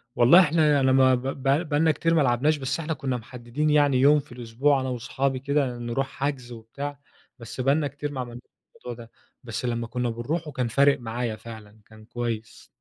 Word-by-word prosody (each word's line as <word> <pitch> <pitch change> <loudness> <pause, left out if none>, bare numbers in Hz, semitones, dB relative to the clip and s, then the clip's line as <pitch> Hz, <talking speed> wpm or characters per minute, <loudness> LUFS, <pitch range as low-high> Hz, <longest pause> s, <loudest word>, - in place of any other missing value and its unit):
والله 125 +9 +7
إحنا 155 -4 +3
أنا 130 -1 +3
ما 130 -1 +5
ب 125 - -4
ب 135 0 -5 0.3
بقى 145 -1 +1
لنا 160 -1 +4
كتير 165 +2 0
ما 165 - +4
لعبناش، 140 +4 +2
بس 140 +2 -3
إحنا 160 0 -2
كنا 135 -5 -3
محددين 125 +5 -4
يعني 145 -3 +3
يوم 145 +2 +6
في 145 -2 -12
الأسبوع 125 +4 0
أنا 130 - -3
وصحابي 130 +2 -2
كده 140 -2 -1
نروح 120 +3 -2
حجز 135 -3 -4
وبتاع، 140 +5 -7 0.4
بس 115 +2 -6
بقى 135 +2 +3
لنا 150 -2 0
كتير 145 +1 -6
ما 135 - -6
عملناش 120 0 -8 0.3
الموضوع 120 -1 -9
ده، 115 - -23 0.3
بس 115 +1 -5
لما 115 -1 -2
كنا 125 0 -2
بنروحه 150 +8 -3
كان 125 -3 -2
فارق 140 +4 +3
معايا 120 -1 -3
فعلًا، 110 -2 -12
كان 110 -1 -15
كويس. 115 -2 -5
130 Hz, 200 wpm, -25 LUFS, 120-145 Hz, 0.4 s, والله